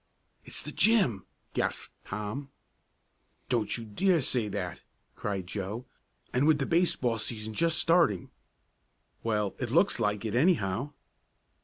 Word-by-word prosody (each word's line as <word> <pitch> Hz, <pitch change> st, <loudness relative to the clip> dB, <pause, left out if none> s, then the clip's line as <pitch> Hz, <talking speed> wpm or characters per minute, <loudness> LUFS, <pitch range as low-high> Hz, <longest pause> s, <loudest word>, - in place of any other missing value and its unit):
"It's -, -, -1 dB
the -, -, -5 dB
gym!" 200 Hz, -, +3 dB, 0.3 s
gasped -, -, -2 dB
Tom. 105 Hz, +8 st, -5 dB, 1.0 s
"Don't 120 Hz, -3 st, +1 dB
you 115 Hz, -, -7 dB
dare 165 Hz, -, +2 dB
say 120 Hz, -4 st, +1 dB
that!" 95 Hz, -3 st, -4 dB, 0.3 s
cried 100 Hz, -3 st, -3 dB
Joe, 105 Hz, +6 st, -4 dB, 0.5 s
"and 130 Hz, +4 st, +3 dB
with 155 Hz, -2 st, +5 dB
the 135 Hz, -, -1 dB
baseball 135 Hz, -9 st, +2 dB
season 110 Hz, 0 st, -2 dB
just 165 Hz, +6 st, +2 dB
starting." 165 Hz, -, +3 dB, 0.9 s
"Well, 105 Hz, -3 st, 0 dB
it 125 Hz, -, -2 dB
looks 170 Hz, -, +3 dB
like 105 Hz, -1 st, 0 dB
it 110 Hz, -, -2 dB
anyhow." 130 Hz, -, +2 dB
115 Hz, 130 wpm, -29 LUFS, 105-150 Hz, 1.0 s, with